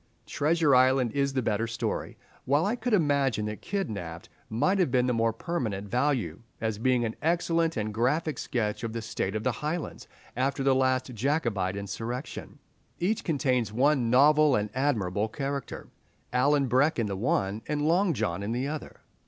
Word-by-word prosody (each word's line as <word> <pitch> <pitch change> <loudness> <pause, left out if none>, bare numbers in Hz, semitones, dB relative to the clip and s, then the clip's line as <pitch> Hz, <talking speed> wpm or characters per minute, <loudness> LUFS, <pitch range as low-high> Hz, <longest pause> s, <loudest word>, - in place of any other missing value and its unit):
"Treasure 155 -1 +2
Island" 130 -1 +4
is 140 +1 0
the 130 -2 0
better 110 +1 0
story, 115 0 -3 0.3
while 145 +5 +2
I 210 +4 +1
could 245 -2 +1
imagine 140 - +1
that 105 0 -5
"Kidnapped" 100 - -4 0.2
might 185 - +1
have 175 -8 +2
the 125 -1 +3
more 115 0 +2
permanent 110 - -3
value 125 - 0 0.2
as 110 -2 -2
being 125 0 +2
an 110 - -3
excellent 165 -1 +1
and 110 0 -2
graphic 135 +6 0
sketch 110 -3 -2
of 115 -1 -3
the 115 - -3
state 100 -2 -3
of 110 - -2
the - - +2
Highlands 155 +2 -4 0.3
after 135 +2 0
the 135 0 +4
last 130 -1 +1
Jacobite 115 - 0
insurrection. 115 +6 -5 0.4
Each 205 +5 0
contains 130 - 0
one 130 +1 +2
novel 145 +3 +5
and 105 -1 -1
admirable 110 -7 0
character, 140 +3 -5 0.4
Alan 140 +3 +3
Breck 130 +5 +2
in 115 - +1
the 100 -2 -3
one, 100 -1 0
and 150 -1 -1
Long 175 +3 +3
John 85 -4 -1
in 105 +3 -2
the 125 +3 -1
other. 155 +1 -6
130 Hz, 170 wpm, -28 LUFS, 110-150 Hz, 0.4 s, novel